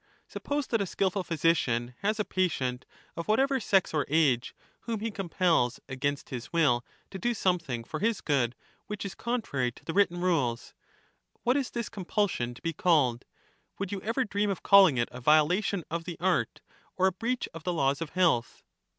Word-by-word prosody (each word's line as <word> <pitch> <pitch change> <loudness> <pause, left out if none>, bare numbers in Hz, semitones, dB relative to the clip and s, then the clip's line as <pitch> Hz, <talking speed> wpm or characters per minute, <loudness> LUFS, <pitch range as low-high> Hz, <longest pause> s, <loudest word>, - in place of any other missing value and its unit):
Suppose 290 0 -3
that 230 -4 0
a 200 - -1
skilful 190 +1 0
physician 140 -8 +1
has 215 +2 0
a 210 - +1
patient, 130 -9 -1 0.3
of - - -3
A - - -7
phy - - -24
whatever 270 +4 +2
sex 195 -6 +2
or 150 -2 0
age, 135 -5 +2 0.3
whom 225 -2 -2
he 225 +2 -3
compels 175 - +1
against 140 +2 -3
his 125 -2 -6
will 145 -8 +3 0.3
to 190 - -6
^^^ijl^ed - - -16
do 240 0 +1
something 170 - 0
for - - -6
his 225 0 +1
good 130 -5 0 0.3
which 210 -1 -5
is 195 - -5
contrary 220 - -2
to - - -18
the 165 - -3
written 195 -2 +3
for - - -4
curing 180 0 +3
rules; 120 -4 -3 0.7
what 250 +2 +3
is 275 -3 0
this 235 -2 -4
compulsion 190 - -1
to - - -16
be 165 -1 -1
called? 145 -9 +2 0.5
Would 200 - -4
you 200 - -3
* - - -16
^^"^^ - - -18
ever 235 +4 0
dream 205 -1 0
of 195 - -3
calling 195 -9 +7
it 120 - +1
a 125 +1 -9
violation 165 - +3
of 165 0 -3
the 170 -3 -6
art, 175 -10 0 0.4
or 185 - +3
a 190 - +4
breach 230 +7 -2
wm; 165 - -7
of - - -21
the 180 - -1
laws 140 -2 +1
of 165 - -3
health 120 -12 +2
175 Hz, 210 wpm, -29 LUFS, 135-205 Hz, 0.7 s, calling